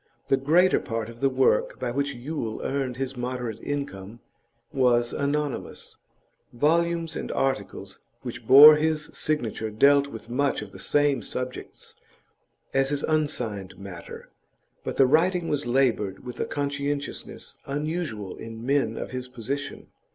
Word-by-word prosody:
The - - +5
greater 170 +7 +4
part 115 -1 -4
of 115 0 -12
the 135 - +3
work 130 0 +2
by 125 - -2
which 140 +2 -1
Yule 120 -3 -4
earned 135 -3 -2
his 135 0 -3
moderate 125 -3 -4
income 115 -7 -5 0.5
was 120 -3 +2
anonymous: 145 0 -3 0.5
volumes 165 +4 +1
and - - -4
articles 100 -6 -2 0.2
which 120 -2 -7
bore 150 +3 +11
his 155 0 -1
signature 115 -7 -2
dealt 140 +6 +4
with 115 -5 -10
much 135 +3 0
the 100 -2 -10
same 145 +4 +2
subjects 125 0 -6 0.8
as 135 0 +2
his 145 0 -1
unsigned 125 -11 -2
matter, 95 -4 -10 0.5
but - - -4
the 135 - +6
writing 165 +5 +2
was 145 -4 -1
laboured 120 -6 +1
with 125 -1 -7
a - - 0
conscientiousness 140 0 -4
unusual 145 - -3
in 115 +1 -8
men 135 -5 +1
of - - -5
his 125 0 -4
position. 130 +4 -5
135 Hz, 135 wpm, -26 LUFS, 115-145 Hz, 0.8 s, bore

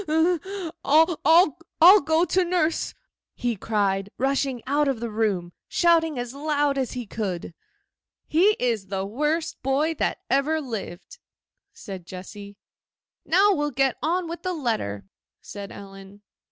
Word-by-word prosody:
'I'll 330 +4 +5
go 320 +2 +3
to 370 +2 +2
nurse!' 340 -2 0 0.4
he 240 -1 -1
cried, 200 -1 -1
rushing 270 -2 -1
out 290 +2 +1
of 270 -4 -1
the 235 -1 -4
room, 200 -6 -1
shouting 325 -4 +2
as 245 0 -4
loud 290 0 0
as 265 -3 -2
he 250 -2 -5
could. 190 -6 -4 0.7
'He 385 +7 +3
is 230 -6 -1
the 190 0 -3
worst 300 +10 -2
boy 280 +5 +1
that - - 0
ever 295 +4 +1
lived!' 220 - -7 0.5
said 190 -5 -9
Jessy. 200 +2 -10 0.7
'Now 395 +4 +4
we'll 295 -3 -1
get 270 -1 +1
on 340 +4 0
with 335 +1 -6
the 370 0 -2
letter,' 220 - -2 0.3
said 200 -1 -9
Ellen. 195 0 -12
270 Hz, 130 wpm, -24 LUFS, 205-320 Hz, 0.7 s, I'll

